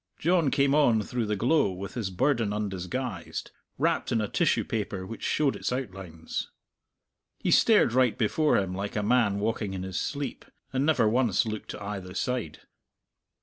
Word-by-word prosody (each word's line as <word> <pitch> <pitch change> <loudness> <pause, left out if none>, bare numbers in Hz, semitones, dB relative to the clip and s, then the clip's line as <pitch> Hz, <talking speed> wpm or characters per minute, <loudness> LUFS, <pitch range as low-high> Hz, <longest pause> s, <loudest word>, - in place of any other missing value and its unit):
John 170 -3 +2
came 140 +1 +2
on 120 -8 +4
through 120 0 -2
the 105 - 0
glow 120 +1 +2
with 95 +2 -7
his 115 -6 -3
burden 115 +1 +1
undisguised, 105 +1 -4 0.3
wrapped - - 0
in 115 - +2
a 105 - 0
tissue - - +2
paper 100 -4 -3
which 115 +3 -8
showed 145 -3 +1
its - - -3
outlines. 95 -10 -5 0.9
He - - -1
stared 210 - +5
right 125 -3 +3
before 150 +8 +2
him 95 -2 -1
like 100 +4 -4
a 105 - 0
man 110 -2 +3
walking 105 -2 -2
in 95 - -4
his 95 -1 -3
sleep, 140 -1 -4 0.3
and 135 +3 +1
never 155 -8 +4
once 115 -2 +2
looked 110 -1 -5
to - - -6
either 100 -3 -6
side. 125 -8 -2
110 Hz, 170 wpm, -28 LUFS, 100-130 Hz, 0.9 s, stared